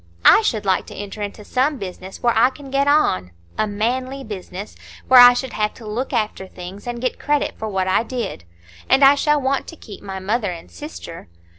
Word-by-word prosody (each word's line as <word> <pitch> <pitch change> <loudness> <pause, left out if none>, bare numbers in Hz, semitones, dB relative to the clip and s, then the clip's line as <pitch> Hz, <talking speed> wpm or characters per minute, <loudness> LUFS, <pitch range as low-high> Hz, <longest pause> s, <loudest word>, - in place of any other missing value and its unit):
I - - +8
should 220 - -1
like 190 -1 +1
to - - -10
enter 205 +1 -7
into 205 +1 -6
some 270 +6 0
business 190 -1 -8
where 240 -1 +3
I 225 +3 +5
can 275 0 -12
get 275 +1 +1
on,—a 90 - 0
manly 255 +6 -2
business, 200 -2 -8 0.3
where 255 -1 +8
I 245 0 +10
should 260 +1 -4
have 210 0 -1
to 230 - -12
look 225 +5 -3
after 215 -5 -2
things, 185 +4 -10
and 240 0 -4
get 255 +1 -2
credit 295 0 0
for 220 - -3
what 190 -2 -1
I 190 - +3
did. 235 - -5 0.5
And 265 +2 +5
I 275 +1 +9
shall 295 +1 +2
want 270 0 -1
to 330 - -9
keep 215 -10 -12
my 195 -1 -6
mother 205 +3 -1
and 170 -2 -8
sister." 170 - -9
220 Hz, 205 wpm, -21 LUFS, 195-265 Hz, 0.5 s, I